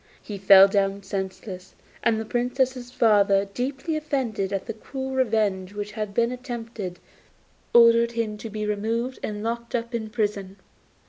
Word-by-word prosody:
He 205 -2 -7
fell 195 0 +8
down 195 0 0
senseless, 190 -1 -6 0.3
and 220 -1 +2
the 220 - -4
Princess's 250 +1 -1
father, 200 -5 +3
deeply 265 +9 -3
offended 260 -10 -2
at 195 -1 -2
the 225 - -4
cruel 265 +4 -6
revenge 210 -7 0
which 205 0 -4
had 215 -1 -4
been 235 +3 +1
attempted, 230 -7 -6 0.7
ordered 235 0 +6
him 225 -2 -2
to 225 - -7
be 215 0 -4
removed 225 +5 -2
and 210 0 -4
locked 235 +1 -3
up 235 +1 -3
in 220 -2 -3
prison. 205 -4 -2
220 Hz, 150 wpm, -25 LUFS, 200-240 Hz, 0.7 s, fell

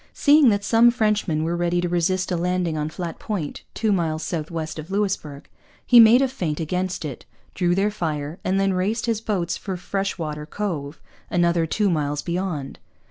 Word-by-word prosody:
Seeing 290 -2 +5
that 200 -1 +1
some 225 +3 +5
Frenchmen 210 -9 0
were 165 +2 -1
ready 175 0 0
to 175 - 0
resist 185 +2 0
a - - +1
landing 180 -1 -1
on 150 0 -2
Flat 170 +1 -6
Point, 190 -10 -4
two 220 -1 +1
miles 160 -4 0
south 160 -2 -3
west 160 -2 -5
of 155 +3 -8
Louisbourg, 190 -8 -2 0.4
he 245 - +7
made 230 +3 +8
a - - +3
feint 170 - -3
against 180 +2 -2
it, 140 -4 -6 0.3
drew 175 -1 +1
their 200 +2 +1
fire, 155 -4 -4
and 190 +1 +1
then 195 -1 +2
raced 205 +6 -1
his 225 -2 -1
boats 180 -6 -1
for 190 -3 -5
Freshwater 165 -6 -3
Cove, 165 -7 -4 0.3
another 170 -1 +2
two 205 +4 +1
miles 150 -2 -1
beyond. 170 -6 -3
175 Hz, 185 wpm, -23 LUFS, 160-200 Hz, 0.4 s, made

